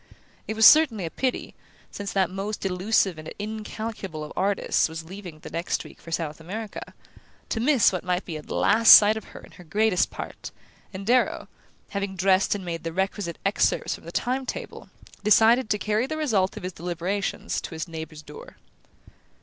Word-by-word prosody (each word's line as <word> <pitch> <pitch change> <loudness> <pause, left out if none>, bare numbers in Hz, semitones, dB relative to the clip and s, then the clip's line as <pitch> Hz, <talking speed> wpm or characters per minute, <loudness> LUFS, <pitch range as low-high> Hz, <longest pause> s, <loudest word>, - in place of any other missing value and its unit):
It 220 - -3
was 220 0 +5
certainly 255 - +6
a 165 - -5
pity, 260 -2 -2 0.4
since 200 -1 -5
that 190 -2 +1
most 200 +2 -4
elusive 190 -2 +1
and 155 - -8
incalculable 215 -5 -5
of 150 - -8
artists 195 -3 +1
was 160 0 -6
leaving 180 -1 -9
the 155 - -11
next 170 +2 -2
week - - -14
for - - -12
South 160 -2 -3
America, 210 +6 -7 0.5
to 225 - -1
miss 255 -1 +4
what 185 - -3
might 180 0 -1
be 165 - -6
a 155 - -5
last 225 +8 +7
sight 210 +1 +6
of 220 - -6
her - - -12
in - - -15
her 180 - -14
greatest 200 +3 +1
part; - - -8 0.4
and 195 0 -7
Darrow, 250 +3 +2 0.4
having 200 -1 -3
dressed 190 +2 +3
and 195 -2 -6
made 170 -1 -4
the 165 - -3
requisite 190 -1 -2
excerpts 195 - +1
from - - -10
the - - -8
time 260 +2 -1
table, - - -7 0.3
decided 225 +3 +5
to 210 - +2
carry 215 +4 0
the 310 - -4
result 215 -11 0
of 210 - -8
his 185 0 -4
deliberations 175 +4 -3
to 165 - -7
his 160 +2 -4
neighbour's 160 -2 -8
door. 150 - -12
195 Hz, 185 wpm, -25 LUFS, 175-220 Hz, 0.5 s, last